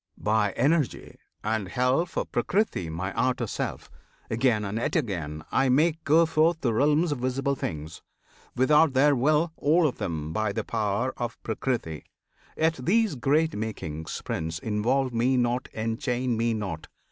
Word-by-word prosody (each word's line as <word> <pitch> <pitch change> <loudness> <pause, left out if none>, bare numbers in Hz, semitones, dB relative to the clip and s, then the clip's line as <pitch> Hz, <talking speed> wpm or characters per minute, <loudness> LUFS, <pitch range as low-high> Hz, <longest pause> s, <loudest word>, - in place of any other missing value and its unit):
By 105 -2 +1
Energy 150 -2 0 0.2
And 110 -2 -1
help 130 - 0
of - - -2
Prakriti 195 - 0
my 90 +4 -4
outer 125 0 0
Self, - - -5 0.4
Again, 110 -2 +2
and 100 +3 -3
yet - - -2
again, 85 - -2
I 135 0 +2
make 155 +5 +2
go 160 +3 +5
forth 160 +1 +2
The 120 -4 +1
realms 150 +7 +2
of 145 - -2
visible 135 +2 0
things 80 - -5 0.5
without 150 +3 +4
their 140 +2 +4
will 150 +6 +2
All 160 +4 +3
of 135 - -5
them 80 -3 -3
by 110 0 0
the - - -2
power 110 +3 -1
of 120 -1 -4
Prakriti. 110 - -3 0.5
Yet 160 -2 +1
these 215 - +2
great 150 +5 +1
makings, 80 -8 -5
Prince! 80 0 -3
involve 120 - 0
Me 125 +3 +2
not 120 +1 0
Enchain 120 +2 -1
Me 115 0 0
not! 95 -7 -5
125 Hz, 155 wpm, -26 LUFS, 105-145 Hz, 0.5 s, go